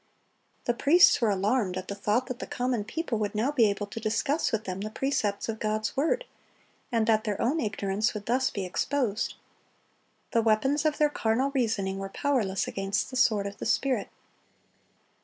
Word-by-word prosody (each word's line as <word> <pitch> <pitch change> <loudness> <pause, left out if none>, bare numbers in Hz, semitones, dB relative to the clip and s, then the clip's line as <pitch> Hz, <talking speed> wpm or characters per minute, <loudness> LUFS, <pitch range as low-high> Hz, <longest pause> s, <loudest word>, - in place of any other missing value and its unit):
The 240 - +2
priests 305 +7 +5
were 230 - +3
alarmed 200 0 +1
at 185 - -5
the - - -3
thought 210 +5 0
that 255 -1 -6
the - - -5
common 245 -3 -1
people 240 -2 -3
would 210 0 -2
now 235 +7 +1
be 235 -7 +4
able 200 +1 -2
to 205 +3 -7
discuss 275 +8 0
with 220 -1 -1
them 185 -1 -5
the 215 - -3
precepts 220 -4 -1
of 220 -1 -4
God's 215 0 -1
word, 330 - +1 0.7
and 230 -2 +2
that 220 -1 +3
their 210 -3 -2
own 280 +7 +1
ignorance 205 -2 -1
would 205 -1 -5
thus 260 +2 +1
be 195 -2 -4
exposed. 220 +3 -1 1.0
The 230 - +3
weapons 265 +8 +2
of 305 -1 +2
their 300 -1 +3
carnal 250 +3 0
reasoning 215 -7 -1
were 195 0 -5
powerless 215 -7 0
against 195 +5 -2
the - - -7
sword 220 -5 +3
of 200 0 -6
the - - -4
Spirit. 265 -2 +1
225 Hz, 185 wpm, -28 LUFS, 205-260 Hz, 1.0 s, priests